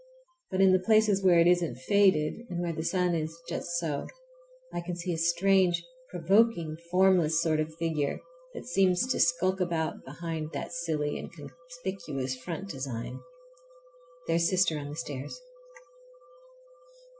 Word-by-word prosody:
But 185 Hz, -, 0 dB
in 190 Hz, -1 st, +6 dB
the 185 Hz, -, +4 dB
places 215 Hz, 0 st, +3 dB
where 175 Hz, -2 st, +6 dB
it 170 Hz, -, +5 dB
isn't 175 Hz, -6 st, +2 dB
faded, 195 Hz, -, +2 dB
and 175 Hz, -1 st, -3 dB
where 175 Hz, -1 st, -2 dB
the 160 Hz, -, -4 dB
sun 180 Hz, 0 st, +1 dB
is 160 Hz, 0 st, -3 dB
just -, -, -4 dB
so, 155 Hz, -4 st, -3 dB, 0.7 s
I -, -, -2 dB
can 175 Hz, 0 st, -5 dB
see 175 Hz, 0 st, -3 dB
a -, -, -3 dB
strange, 175 Hz, +1 st, +3 dB, 0.3 s
provoking, 175 Hz, -2 st, +2 dB
formless 180 Hz, -3 st, +4 dB
sort 160 Hz, -2 st, +1 dB
of 155 Hz, +1 st, -3 dB
figure, 160 Hz, -3 st, -1 dB, 0.4 s
that -, -, -7 dB
seems 195 Hz, -3 st, +2 dB
to -, -, 0 dB
sulk 185 Hz, +3 st, +2 dB
about 170 Hz, -3 st, -1 dB
behind 160 Hz, +2 st, -5 dB
that -, -, -4 dB
silly 160 Hz, -3 st, -2 dB
and -, -, -7 dB
conspicuous 170 Hz, -2 st, -6 dB
front 165 Hz, +9 st, -6 dB
design. 130 Hz, -5 st, -5 dB, 1.1 s
There's 165 Hz, 0 st, +2 dB
sister 185 Hz, -4 st, +2 dB
on 145 Hz, 0 st, -6 dB
the 145 Hz, -, -6 dB
stairs! 145 Hz, -, -6 dB
170 Hz, 145 wpm, -29 LUFS, 155-185 Hz, 1.1 s, in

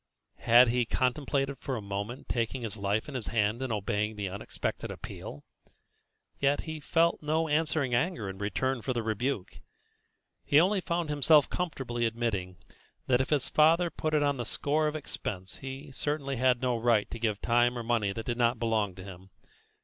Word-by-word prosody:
Had 120 Hz, +1 st, +6 dB
he 125 Hz, +1 st, +2 dB
contemplated 135 Hz, +3 st, 0 dB
for 135 Hz, -, -3 dB
a -, -, -3 dB
moment 100 Hz, +5 st, -5 dB
taking 120 Hz, +1 st, -2 dB
his 110 Hz, -2 st, -4 dB
life 100 Hz, +1 st, -1 dB
in 145 Hz, -, -7 dB
his 125 Hz, -4 st, -4 dB
hand 110 Hz, +1 st, 0 dB
and 130 Hz, -2 st, -2 dB
obeying 105 Hz, +1 st, -1 dB
the 100 Hz, -2 st, -3 dB
unexpected 100 Hz, +2 st, -4 dB
appeal? 75 Hz, -, -8 dB, 1.0 s
Yet 140 Hz, +1 st, +2 dB
he 160 Hz, -1 st, -6 dB
felt 165 Hz, +3 st, +2 dB
no 160 Hz, +2 st, 0 dB
answering 150 Hz, -3 st, +1 dB
anger 120 Hz, -, 0 dB
in 95 Hz, 0 st, -7 dB
return 120 Hz, +5 st, -1 dB
for 130 Hz, -, -2 dB
the 120 Hz, -2 st, -2 dB
rebuke; 110 Hz, -1 st, -2 dB, 0.8 s
he 145 Hz, -, +5 dB
only 190 Hz, +3 st, +3 dB
found 170 Hz, -3 st, -2 dB
himself 150 Hz, 0 st, +4 dB
comfortably 135 Hz, -9 st, -2 dB
admitting 105 Hz, -6 st, -2 dB, 0.5 s
that 125 Hz, 0 st, +3 dB
if 130 Hz, -, -3 dB
his 145 Hz, -4 st, +1 dB
father 165 Hz, +3 st, +4 dB
put 155 Hz, -1 st, -1 dB
it 150 Hz, -, +3 dB
on 145 Hz, -1 st, +1 dB
the 120 Hz, -, -2 dB
score 150 Hz, +6 st, 0 dB
of 150 Hz, -, -2 dB
expense 95 Hz, -, -4 dB
he 135 Hz, +2 st, -8 dB
certainly 140 Hz, +2 st, -2 dB
had 125 Hz, 0 st, +2 dB
no 125 Hz, -1 st, +2 dB
right 115 Hz, -2 st, +2 dB
to 115 Hz, -, -6 dB
give 110 Hz, -3 st, 0 dB
time 120 Hz, +1 st, +2 dB
or 120 Hz, -, -4 dB
money 115 Hz, -4 st, +1 dB
that 110 Hz, +3 st, -6 dB
did 120 Hz, -1 st, -2 dB
not 120 Hz, 0 st, +3 dB
belong 110 Hz, -4 st, 0 dB
to 95 Hz, -, -9 dB
him. 95 Hz, -1 st, -11 dB
125 Hz, 185 wpm, -29 LUFS, 110-145 Hz, 1.0 s, Had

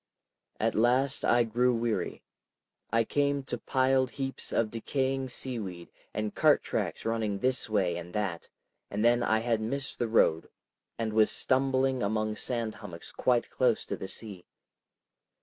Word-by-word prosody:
At -, -, +1 dB
last 125 Hz, +5 st, +2 dB
I 120 Hz, 0 st, +4 dB
grew 120 Hz, +2 st, +2 dB
weary. 115 Hz, -1 st, -2 dB, 0.7 s
I 115 Hz, +1 st, +3 dB
came 140 Hz, +2 st, 0 dB
to 135 Hz, -, -4 dB
piled 130 Hz, 0 st, +2 dB
heaps 135 Hz, 0 st, -4 dB
of 110 Hz, -2 st, +1 dB
decaying 130 Hz, +3 st, -1 dB
seaweed 105 Hz, -10 st, -5 dB, 0.2 s
and 105 Hz, 0 st, -3 dB
cart -, -, +4 dB
tracks -, -, -3 dB
running 110 Hz, -3 st, 0 dB
this 130 Hz, +2 st, 0 dB
way 95 Hz, -5 st, +1 dB
and 85 Hz, 0 st, -7 dB
that, 95 Hz, -6 st, -2 dB, 0.4 s
and 105 Hz, +3 st, -1 dB
then 120 Hz, 0 st, +4 dB
I 110 Hz, -2 st, +2 dB
had 115 Hz, -1 st, 0 dB
missed 135 Hz, +5 st, -2 dB
the 120 Hz, -, +1 dB
road 80 Hz, -7 st, +3 dB, 0.5 s
and 110 Hz, -2 st, -2 dB
was 110 Hz, 0 st, +5 dB
stumbling 130 Hz, -1 st, +1 dB
among 110 Hz, +1 st, 0 dB
sand 115 Hz, -3 st, -2 dB
hummocks 85 Hz, -5 st, -8 dB
quite 125 Hz, -2 st, +1 dB
close 125 Hz, -3 st, +2 dB
to -, -, -3 dB
the 95 Hz, -, -6 dB
sea. 100 Hz, -4 st, -6 dB
115 Hz, 150 wpm, -29 LUFS, 105-130 Hz, 0.7 s, was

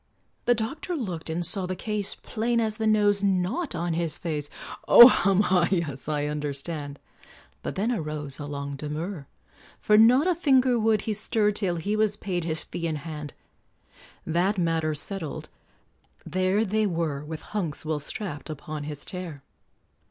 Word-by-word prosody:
The 245 Hz, -, +4 dB
doctor 310 Hz, +11 st, -3 dB
looked 180 Hz, -, -4 dB
and 170 Hz, +2 st, -1 dB
saw 185 Hz, +1 st, 0 dB
the 185 Hz, -, -3 dB
case 210 Hz, +1 st, -1 dB
Plain 235 Hz, +1 st, -1 dB
as 220 Hz, -1 st, -1 dB
the 220 Hz, -1 st, 0 dB
nose 205 Hz, -2 st, +4 dB
not 200 Hz, -, 0 dB
on 170 Hz, 0 st, -1 dB
his 165 Hz, -1 st, -1 dB
face. 150 Hz, -4 st, -3 dB, 0.4 s
"Oh! 240 Hz, -, +11 dB
hum 195 Hz, -5 st, +3 dB
ha 180 Hz, -4 st, +3 dB
yes 155 Hz, -7 st, -2 dB
I 145 Hz, -1 st, 0 dB
understand." 145 Hz, 0 st, -4 dB, 0.6 s
But -, -, -5 dB
then 215 Hz, +5 st, 0 dB
arose 150 Hz, -, -4 dB
a 145 Hz, -, -5 dB
long 140 Hz, -1 st, -5 dB
demur, 150 Hz, +2 st, -5 dB, 0.5 s
For 210 Hz, 0 st, +4 dB
not 250 Hz, +7 st, +6 dB
a 365 Hz, -, +3 dB
finger 265 Hz, -7 st, +3 dB
would 220 Hz, -1 st, +2 dB
he 220 Hz, -, -1 dB
stir 210 Hz, 0 st, +1 dB
Till 195 Hz, -4 st, -1 dB
he 200 Hz, +6 st, -2 dB
was 215 Hz, -1 st, +1 dB
paid 180 Hz, -4 st, -3 dB
his 160 Hz, -1 st, -1 dB
fee 170 Hz, -, -4 dB
in 160 Hz, -, -2 dB
hand; 150 Hz, -1 st, -7 dB, 0.9 s
That 180 Hz, +5 st, +1 dB
matter 165 Hz, -3 st, 0 dB
settled, 160 Hz, -1 st, -3 dB, 0.8 s
there 185 Hz, +4 st, +1 dB
they 215 Hz, +1 st, +1 dB
were, 165 Hz, -5 st, -2 dB
With 155 Hz, 0 st, -7 dB
Hunks 170 Hz, -8 st, -3 dB
well 155 Hz, -1 st, -1 dB
strapped 155 Hz, 0 st, -6 dB
upon 155 Hz, 0 st, -6 dB
his 150 Hz, -1 st, -7 dB
chair. 170 Hz, -7 st, -6 dB
180 Hz, 165 wpm, -26 LUFS, 155-215 Hz, 0.9 s, Oh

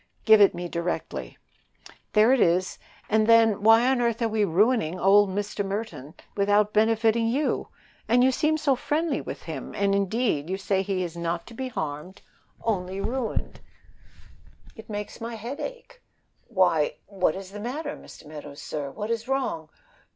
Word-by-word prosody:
"Give 220 Hz, -1 st, +7 dB
it 200 Hz, -, +6 dB
me, 175 Hz, 0 st, -4 dB
directly." 170 Hz, +1 st, -4 dB, 0.8 s
"There 220 Hz, +4 st, +5 dB
it 265 Hz, -, +2 dB
is. 180 Hz, +2 st, +2 dB, 0.3 s
And 220 Hz, 0 st, +2 dB
then, 225 Hz, -3 st, +5 dB
why 225 Hz, +3 st, +6 dB
on 260 Hz, -1 st, +2 dB
earth 235 Hz, -1 st, 0 dB
are -, -, +3 dB
we 215 Hz, -1 st, 0 dB
ruining 190 Hz, -1 st, +2 dB
old 200 Hz, +2 st, +5 dB
Mr. 205 Hz, +1 st, -3 dB
Merton 195 Hz, -, -5 dB, 0.2 s
without 205 Hz, +1 st, +2 dB
benefiting 225 Hz, +1 st, +3 dB
you? 275 Hz, +6 st, 0 dB, 0.4 s
and 245 Hz, +2 st, +4 dB
you 260 Hz, -, +5 dB
seem 305 Hz, +4 st, +1 dB
so 290 Hz, -3 st, +2 dB
friendly 295 Hz, +3 st, -1 dB
with -, -, -7 dB
him; 155 Hz, -5 st, -7 dB
and 200 Hz, 0 st, +1 dB
indeed, 200 Hz, -, 0 dB
you 190 Hz, -, -1 dB
say 195 Hz, 0 st, 0 dB
he 190 Hz, -1 st, -2 dB
is 170 Hz, -2 st, -6 dB
not 170 Hz, 0 st, -3 dB
to 235 Hz, -, -12 dB
be 260 Hz, +3 st, -4 dB
harmed 160 Hz, -2 st, -6 dB, 0.4 s
only 190 Hz, -3 st, -2 dB
ruined; 230 Hz, +3 st, -3 dB, 1.2 s
it 220 Hz, -, -13 dB
makes 210 Hz, +2 st, -6 dB
my 230 Hz, 0 st, -5 dB
head 235 Hz, +6 st, -6 dB
ache. -, -, -8 dB, 0.5 s
Why, 185 Hz, -8 st, +2 dB
what 185 Hz, -5 st, 0 dB
is 190 Hz, 0 st, -8 dB
the 205 Hz, -, -8 dB
matter, 290 Hz, +7 st, -4 dB
Mr. -, -, -14 dB
Meadows, 150 Hz, -1 st, -10 dB
sir? 145 Hz, -2 st, -5 dB
What 210 Hz, +11 st, -5 dB
is 230 Hz, 0 st, -2 dB
wrong? 260 Hz, -, -2 dB
210 Hz, 165 wpm, -26 LUFS, 185-235 Hz, 1.2 s, Give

